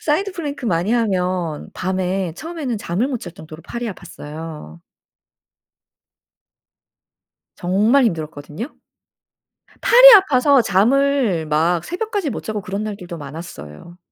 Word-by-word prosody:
사이드 370 +6 0
플랭크 290 -7 -5
많이 175 0 0
하면 185 -8 -1
밤에 185 -1 -2
처음에는 310 - -5
잠을 200 +7 -1
못 250 -5 -3
잘 175 - -8
정도로 155 -1 -12
팔이 235 +5 -5
아팠어요. 155 - -9 2.8
정말 210 +9 +2
힘들었거든요. 160 - -4 1.1
팔이 - - +9
아파서 280 - +5
잠을 225 - +2
막 165 +3 +1
새벽까지 400 - -3
못 - - -5
자고 215 -1 -3
그런 200 +3 -4
날들도 180 -5 -7
많았어요. 145 - -10
190 Hz, 260 characters per minute, -20 LUFS, 165-270 Hz, 2.8 s, 팔이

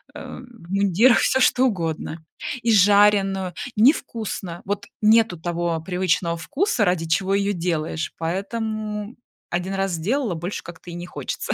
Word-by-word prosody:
э, - - -8
в 235 -8 -14
мундирах, 200 +5 +4
всё 265 - +2
что 255 0 +4
угодно 165 -4 -3 0.4
И 230 - +3
жареную, 200 -2 +4 0.2
не 235 +8 +7
вкусно. 190 - -6
Вот 205 +1 -3
нету 220 -4 +4
того 170 0 -2
привычного 180 -1 0
вкуса, 265 - 0
ради 180 -2 +1
чего 190 +4 +1
её 200 0 +1
делаешь, 165 -2 -2
поэтому 210 +4 -3 0.4
1 180 +3 -2
раз 195 0 0
сделала, 215 - -1
больше 175 +5 -5
как-то 170 +1 -11
и 170 - -7
не 175 - -6
хочется. - - -4
195 Hz, 145 wpm, -23 LUFS, 175-215 Hz, 0.4 s, не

